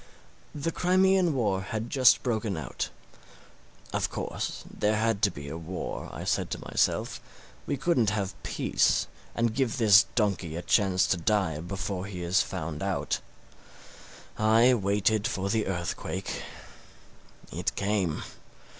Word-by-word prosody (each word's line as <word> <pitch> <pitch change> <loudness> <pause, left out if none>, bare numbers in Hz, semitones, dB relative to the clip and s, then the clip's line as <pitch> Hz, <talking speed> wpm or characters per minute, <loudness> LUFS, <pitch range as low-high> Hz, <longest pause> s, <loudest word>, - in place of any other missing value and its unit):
The 150 +3 -2
Crimean 185 -2 +3
war 100 -7 +1
had 110 +5 -4
just 130 -3 +5
broken 110 -6 -1
out. 70 -6 -4 1.0
Of - - 0
course - - -4
there 105 +1 0
had 110 -1 +1
to - - +5
be 70 0 -9
a 80 +3 -5
war, 85 +3 -5
I - - -7
said - - 0
to - - -4
myself: - - 0 0.5
we - - -1
couldn't 135 -6 +2
have 100 -2 -2
peace - - +1 0.3
and 115 -1 +1
give 130 0 0
this 105 -4 +6
donkey 95 -7 0
a 85 - -4
chance 95 0 +3
to 95 - +1
die 90 -3 +1
before 95 +2 -4
he 90 -3 -6
is 90 +3 +3
found 80 -4 -4
out. 95 -1 -1 1.2
I 110 +4 +5
waited 105 0 +1
for 95 +1 -2
the 110 -1 +1
earthquake. 85 -3 -3 1.1
It - - -2
came. 100 -5 0
100 Hz, 135 wpm, -28 LUFS, 90-115 Hz, 1.2 s, this